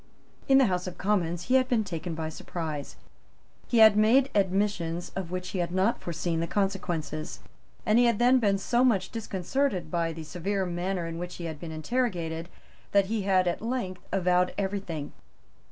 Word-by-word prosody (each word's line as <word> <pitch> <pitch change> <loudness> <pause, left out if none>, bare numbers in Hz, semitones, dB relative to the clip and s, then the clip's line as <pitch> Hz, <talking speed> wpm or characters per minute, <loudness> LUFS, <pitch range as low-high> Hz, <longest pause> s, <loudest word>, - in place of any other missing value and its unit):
In 270 - +6
the 270 - +6
House 180 -3 -1
of 180 - -6
Commons, 175 -4 0
he 255 - -1
had 260 -1 +4
been 235 -4 +2
taken 170 -3 -5
by 160 0 -3
surprise; 155 -3 -5 0.7
he 240 - +1
had 220 -2 +8
made 245 +6 +4
admissions 190 -4 0
of 190 -3 -4
which 180 0 -4
he 190 - -3
had 175 -1 -1
not 190 +5 +1
foreseen 170 0 -2
the 165 - -1
consequences; 175 -6 -2 0.5
and 215 +2 +4
he 245 - +5
had 235 -3 +3
then 250 +3 +5
been 200 -4 +2
so 240 +5 +1
much 200 -7 +2
disconcerted 205 - -2
by 170 -1 0
the 160 0 -7
severe 185 +5 -2
manner 180 0 -2
in 165 0 -5
which 175 0 -5
he 170 - -6
had 160 -3 -5
been 165 -2 -7
interrogated 170 -3 -2 0.4
that 200 -1 +5
he 220 - 0
had 190 -2 +2
at 175 - -1
length 225 -6 -3
avowed 180 -1 +2
everything. 190 -7 -3
185 Hz, 185 wpm, -28 LUFS, 170-210 Hz, 0.7 s, had